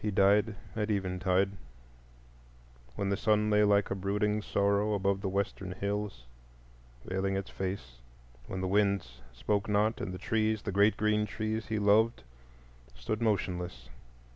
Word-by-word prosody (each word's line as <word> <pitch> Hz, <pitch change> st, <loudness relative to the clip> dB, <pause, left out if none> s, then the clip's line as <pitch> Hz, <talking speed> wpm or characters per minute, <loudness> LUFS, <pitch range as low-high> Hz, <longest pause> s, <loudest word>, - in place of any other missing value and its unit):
He 105 Hz, -, 0 dB
died 100 Hz, +2 st, +3 dB, 0.2 s
at 105 Hz, -1 st, -1 dB
eventide, 95 Hz, -1 st, +1 dB, 1.4 s
when 100 Hz, +5 st, -1 dB
the 100 Hz, -, +2 dB
sun 105 Hz, -1 st, +2 dB
lay 105 Hz, 0 st, +5 dB
like 100 Hz, -1 st, +3 dB
a -, -, 0 dB
brooding 105 Hz, +2 st, 0 dB
sorrow 100 Hz, +1 st, +1 dB
above 100 Hz, 0 st, 0 dB
the 95 Hz, -, -1 dB
western 95 Hz, -1 st, -2 dB
hills, 100 Hz, -8 st, -3 dB, 0.8 s
veiling 95 Hz, +1 st, -1 dB
its 100 Hz, 0 st, -5 dB
face; 90 Hz, -11 st, -5 dB, 0.5 s
when 95 Hz, -, -4 dB
the 95 Hz, -, -1 dB
winds 100 Hz, -10 st, 0 dB
spoke 100 Hz, -, -1 dB
not, 105 Hz, +2 st, +1 dB
and 100 Hz, -, -3 dB
the 95 Hz, -, -5 dB
trees, 110 Hz, +2 st, 0 dB
the 100 Hz, -, -3 dB
great 100 Hz, +3 st, +3 dB
green 105 Hz, 0 st, +1 dB
trees 110 Hz, +1 st, -3 dB
he 110 Hz, -, -1 dB
loved, 105 Hz, -, +3 dB, 0.7 s
stood 105 Hz, -, -3 dB
motionless. 95 Hz, -5 st, -2 dB
100 Hz, 145 wpm, -30 LUFS, 95-105 Hz, 1.4 s, lay